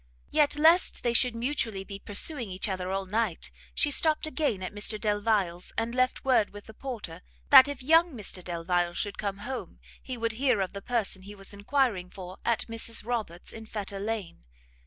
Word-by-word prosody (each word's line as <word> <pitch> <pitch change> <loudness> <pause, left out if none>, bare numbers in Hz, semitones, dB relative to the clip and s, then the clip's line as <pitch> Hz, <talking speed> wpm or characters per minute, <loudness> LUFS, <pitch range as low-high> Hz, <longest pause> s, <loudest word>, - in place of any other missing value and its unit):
Yet, 290 -1 +3
lest 325 +4 +4
they 240 - +1
should 245 0 +2
mutually 230 -5 -1
be 200 0 -8
pursuing 230 - +2
each 185 +4 -2
other 185 -2 -3
all 195 0 -2
night, 210 -2 -1 0.2
she 290 - +2
stopt 310 +2 +5
again 295 - -1
at 185 - -5
Mr 210 +1 0
Delvile's, 205 -4 0
and 230 +1 0
left 255 +1 0
word 250 -6 +3
with 205 0 -12
the 220 - -12
porter, 215 -9 -7 0.3
that 265 -1 +10
if 280 -2 -6
young 325 +4 +5
Mr 190 -3 -3
Delvile 175 0 -1
should 205 -1 -3
come 200 -2 -3
home, 265 - -6 0.2
he 255 -2 -6
would 230 0 -1
hear 250 0 +1
of 190 0 -2
the 200 - -6
person 220 -5 -1
he 200 +2 -11
was 195 0 -10
enquiring 205 -3 0
for 185 0 -10
at 235 -1 0
Mrs 230 -1 -2
Roberts's 220 -8 -3
in 220 0 -9
Fetter 200 -2 -5
lane. 205 - -4
215 Hz, 190 wpm, -28 LUFS, 195-255 Hz, 0.3 s, that